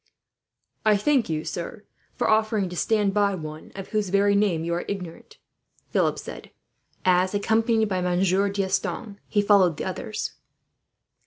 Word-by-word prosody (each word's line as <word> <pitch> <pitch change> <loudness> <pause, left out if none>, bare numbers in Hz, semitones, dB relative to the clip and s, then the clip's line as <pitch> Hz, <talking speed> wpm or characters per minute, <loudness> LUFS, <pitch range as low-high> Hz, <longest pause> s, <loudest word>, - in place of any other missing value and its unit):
"I 215 -1 +4
thank 260 - +2
you, 155 0 -2
sir, 195 +5 -6 0.3
for - - 0
offering 215 -3 +2
to 180 - -7
stand 205 +3 +1
by 200 -1 +2
one 155 -2 -8
of 195 -1 -7
whose 210 -3 -1
very 200 +1 +3
name 195 -6 +2
you 170 +1 -1
are 170 - -1
ignorant," 180 -5 -7 0.5
Philip - - +2
said - - -8 0.6
as, 185 +1 +3
accompanied 220 +2 +2
by 185 -2 0
Monsieur 185 +2 +2
D'Estanges, 200 +2 -2
he 205 -1 +1
followed 195 -6 +4
the - - -4
others. - - -4
200 Hz, 150 wpm, -25 LUFS, 180-210 Hz, 0.6 s, I